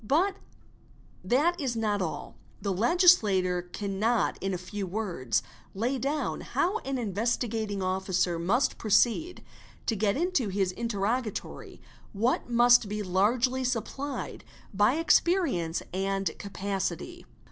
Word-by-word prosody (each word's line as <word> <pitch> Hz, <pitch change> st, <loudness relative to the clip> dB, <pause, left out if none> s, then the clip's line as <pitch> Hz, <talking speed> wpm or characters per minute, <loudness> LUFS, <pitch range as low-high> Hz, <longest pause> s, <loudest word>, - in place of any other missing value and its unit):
But 345 Hz, -, +2 dB, 0.9 s
that 330 Hz, +7 st, +2 dB
is 255 Hz, -4 st, -1 dB
not 210 Hz, -3 st, 0 dB
all. 155 Hz, -5 st, -4 dB, 0.2 s
The 200 Hz, -2 st, -2 dB
legislator 205 Hz, -, +4 dB
cannot 200 Hz, +5 st, -1 dB
in 195 Hz, -, -1 dB
a 185 Hz, -, -1 dB
few 190 Hz, +2 st, -5 dB
words 175 Hz, -, -1 dB, 0.3 s
lay 245 Hz, +6 st, -1 dB
down 285 Hz, +4 st, -2 dB
how 400 Hz, +6 st, 0 dB
an 270 Hz, 0 st, -3 dB
Investigating 220 Hz, -1 st, -1 dB
Officer 185 Hz, -2 st, 0 dB
must 240 Hz, +11 st, +1 dB
proceed 235 Hz, -, +2 dB, 0.4 s
to 225 Hz, -, 0 dB
get 210 Hz, +3 st, +1 dB
into 335 Hz, -, 0 dB
his 190 Hz, -1 st, 0 dB
interrogatory 225 Hz, +2 st, -3 dB, 0.3 s
what 230 Hz, +5 st, 0 dB
must 240 Hz, -2 st, +5 dB
be 210 Hz, 0 st, -3 dB
largely 230 Hz, +8 st, +1 dB
uupplied 260 Hz, +3 st, -3 dB, 0.3 s
by 205 Hz, +6 st, +3 dB
experience 325 Hz, -, +2 dB
and 195 Hz, -1 st, -1 dB
capacity. 200 Hz, -1 st, -4 dB
215 Hz, 115 wpm, -28 LUFS, 195-255 Hz, 0.9 s, must